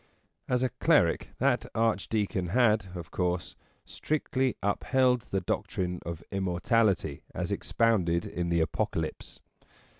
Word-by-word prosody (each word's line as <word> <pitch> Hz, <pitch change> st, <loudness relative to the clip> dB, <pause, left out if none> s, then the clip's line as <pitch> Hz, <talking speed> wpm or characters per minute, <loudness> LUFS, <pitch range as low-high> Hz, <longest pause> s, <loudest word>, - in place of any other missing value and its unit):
As 125 Hz, 0 st, +2 dB
a 130 Hz, -, +2 dB
cleric -, -, +2 dB
that -, -, +1 dB
Archdeacon 110 Hz, -4 st, 0 dB
had, 110 Hz, 0 st, +3 dB
of 85 Hz, -2 st, -7 dB
course, 90 Hz, -1 st, -1 dB, 0.3 s
strictly 135 Hz, -4 st, -1 dB
upheld 125 Hz, +4 st, +2 dB
the 95 Hz, -, 0 dB
doctrine 90 Hz, -1 st, -2 dB
of 85 Hz, -1 st, -5 dB
Immortality 95 Hz, -, +1 dB
as -, -, -2 dB
expounded 90 Hz, -7 st, +1 dB
in 85 Hz, -1 st, -3 dB
the 85 Hz, -1 st, +2 dB
Apocalypse. 80 Hz, -, -3 dB
100 Hz, 115 wpm, -29 LUFS, 90-115 Hz, 0.3 s, had